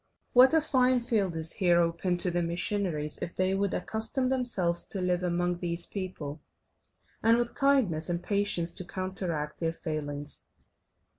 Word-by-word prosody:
What 260 +5 +7
a 320 - +5
fine 255 -4 +3
field 210 -7 0
is 160 0 0
here 175 -3 +3
open 170 +1 0
to 175 0 -1
the 175 0 0
missionaries 170 -3 -1
if 170 - -5
they 185 +1 +1
would 195 0 0
accustom 235 +4 -1
themselves 220 -10 +1
to 195 - -1
live 180 -1 0
among 175 0 0
these 170 -1 0
people, 165 -7 -6 0.8
and 230 +1 +5
with 240 0 -1
kindness 255 - +2
and 170 0 -2
patience 200 -4 +1
to 185 - -6
counteract 180 -5 -4
their 165 -1 0
failings! 145 -3 -3
180 Hz, 155 wpm, -29 LUFS, 170-210 Hz, 0.8 s, What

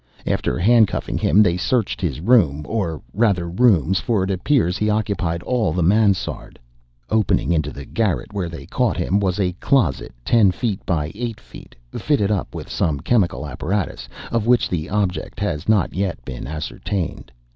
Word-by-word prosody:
After - - -1
hand 115 +3 +5
cuffing - - -3
him, 105 - +5
they 90 -3 +1
searched 110 +2 0
his 75 -5 -2
room, 85 - +3
or 85 -7 -2
rather 100 -5 +1
rooms, 95 -2 +3
for 110 -5 0
it 95 - -1
appears 95 - +1
he 105 +1 0
occupied 100 -6 -1
all 115 -10 0
the 90 0 0
mansarde. 100 +1 +1 0.5
Opening 110 -5 +2
into 80 -2 +1
the 70 - -9
garret 105 - -1
where 95 -4 -2
they 85 - -8
caught - - 0
him, 100 - +1
was 95 -1 0
a 90 -2 +1
closet, 100 - +1
ten 110 -5 +5
feet 100 +2 -2
by 80 -3 -1
eight, 115 +1 -5
fitted 100 - -3
up 100 -4 -2
with - - -6
some 75 -4 -1
chemical 85 - +1
apparatus, 75 -3 -3 0.2
of 115 -1 0
which 125 0 +3
the 85 -1 -3
object 100 +1 -2
has 100 -5 -2
not 105 -6 +2
yet 95 0 -3
been 65 -2 -6
ascertained. 80 0 -4
95 Hz, 165 wpm, -21 LUFS, 85-110 Hz, 0.5 s, hand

